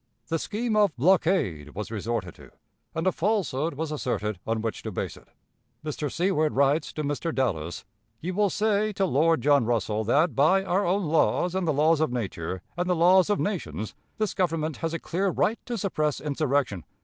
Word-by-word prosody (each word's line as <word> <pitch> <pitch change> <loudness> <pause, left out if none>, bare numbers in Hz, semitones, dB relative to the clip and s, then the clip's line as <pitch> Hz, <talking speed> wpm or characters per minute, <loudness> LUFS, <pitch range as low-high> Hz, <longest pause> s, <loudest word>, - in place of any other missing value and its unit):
The 165 - 0
scheme 220 +5 -2
of 205 -6 +3
blockade 140 - +1
was 105 +2 -5
resorted 105 -4 -3
to, - - -15 0.5
and 160 +2 -1
a 185 - +4
falsehood 170 -7 0
was 155 +1 -3
asserted 110 - -2
on 110 0 -1
which 115 - -3
to - - -5
base - - -4
it. - - -17 0.6
Mr. 150 -2 -3
Seward 170 -4 +1
writes 140 +3 +2
to 155 - -3
Mr. 145 +3 -2
Dallas: 90 - -2 0.3
"You 180 +7 -4
will 205 +1 +2
say 215 +1 +1
(to 195 0 +1
Lord 165 +1 +2
John 145 -3 +4
Russell) 110 -2 0
that, 150 - +2
by 185 +8 +4
our 195 +1 +1
own 190 +2 +1
laws 165 +3 +2
and 190 -2 -1
the - - +3
laws 155 +2 +3
of 155 - +1
nature 95 -6 -4
and 175 +1 -1
the 180 - +3
laws 180 +3 +5
of 205 - +2
nations, 110 - -3 0.2
this 215 -1 -1
Government 160 -4 -1
has 165 0 -2
a - - -3
clear 190 +4 -1
right 210 +4 +1
to 240 -2 -2
suppress 155 -7 -1
insurrection. 140 - -1
155 Hz, 190 wpm, -26 LUFS, 125-185 Hz, 0.6 s, laws